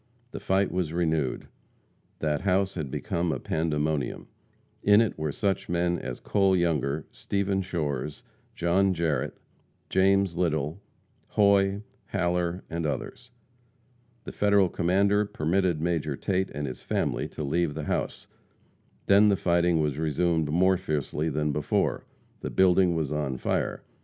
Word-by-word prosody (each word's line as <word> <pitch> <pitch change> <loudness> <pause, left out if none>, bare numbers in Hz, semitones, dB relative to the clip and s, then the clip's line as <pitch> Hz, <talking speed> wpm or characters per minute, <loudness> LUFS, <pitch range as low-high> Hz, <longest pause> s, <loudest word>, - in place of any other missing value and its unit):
The - - -6
fight 95 +1 +1
was 90 -3 -2
renewed. 80 -6 -1 0.7
That 75 -2 0
house 95 0 +1
had 80 -6 -4
become 85 +5 -2
a - - -1
pandemonium. 80 -2 -1 0.6
In 105 +1 +6
it 115 -2 +1
were 75 -1 -2
such 95 +5 -1
men 85 0 +1
as 60 - -6
Cole 95 -2 +2
Younger, 80 -4 0
Stephen 100 -1 -1
Shores, 75 -6 -3 0.3
John 95 +2 +2
Jarrette, 80 -5 -1 0.5
James 95 -1 +3
Little, 80 0 -1 0.5
Hoy, 100 0 +3 0.2
Haller, 90 -1 -1
and 85 -1 -2
others. 120 +10 -5 0.9
The - - -7
Federal 100 -2 +3
commander 100 +5 +2
permitted 90 -2 0
Major 80 -3 -1
Tate 95 -1 -1
and 75 +1 -4
his 65 -3 -6
family - - -1
to - - -6
leave 75 +1 0
the 80 - -4
house. - - -3 0.8
Then 100 +2 +6
the 100 - +3
fighting 85 -2 +2
was 75 -1 -1
resumed 80 0 +1
more 95 +4 +3
fiercely 75 -2 -2
than 75 0 0
before. 75 0 0 0.3
The - - -4
building 90 -1 +4
was 80 -3 -1
on 75 -4 -2
fire. - - -2
85 Hz, 135 wpm, -27 LUFS, 75-95 Hz, 0.9 s, In